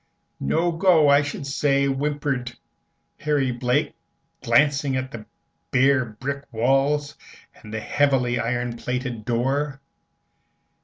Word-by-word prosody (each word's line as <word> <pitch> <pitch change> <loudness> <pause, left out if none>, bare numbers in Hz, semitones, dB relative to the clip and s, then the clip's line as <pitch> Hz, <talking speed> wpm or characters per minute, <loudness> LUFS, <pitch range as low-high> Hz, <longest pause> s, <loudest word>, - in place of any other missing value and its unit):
"No 165 - +1
go, 165 -3 +4
I 140 0 +6
should 145 -1 -5
say," 140 0 +1
whimpered 140 -2 -2 0.7
Harry 145 -4 +1
Blake, 125 +3 0 0.5
glancing 145 -2 +2
at 130 0 -3
the 110 -4 -9 0.4
bare 130 0 +3
brick 135 +6 -6
walls 135 +5 +1 0.4
and 105 - -14
the 110 0 -4
heavy 130 -3 +1
ironplated 120 0 -3
door. 135 +4 -1
135 Hz, 105 wpm, -23 LUFS, 125-145 Hz, 0.7 s, I